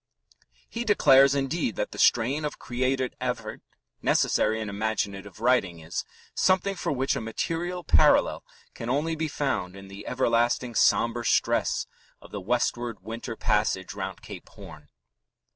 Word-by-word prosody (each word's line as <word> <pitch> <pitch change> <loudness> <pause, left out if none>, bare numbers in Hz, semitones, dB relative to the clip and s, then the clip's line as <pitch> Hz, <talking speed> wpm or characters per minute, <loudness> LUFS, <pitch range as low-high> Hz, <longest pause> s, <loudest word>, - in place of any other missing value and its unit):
He 235 - -4
declares, 140 - +5
indeed, 135 - -1
that - - -3
the - - -9
strain 130 +6 +3
of 150 - -3
creative 130 +1 -1
effort - - -3 0.4
necessary 110 +1 +2
in 110 - -4
imaginative 100 -1 -3
writing 115 -8 +2
is 80 0 -5 0.3
"something 190 +1 +2
for 190 - -3
which 135 -1 0
a - - -3
material 165 +10 -3
parallel - - +4 0.3
can 115 - -6
only 150 +5 0
be 160 0 -2
found 135 -11 -2
in 95 0 -11
the 100 +1 -10
everlasting 120 -1 +1
sombre 115 +2 +2
stress - - +1 0.3
of - - -16
the 105 - -5
westward 120 +2 -1
winter 115 +1 -6
passage 105 -4 0
round 95 -2 -6
Cape - - -10
Horn." 75 -1 -13
120 Hz, 145 wpm, -26 LUFS, 105-140 Hz, 0.4 s, declares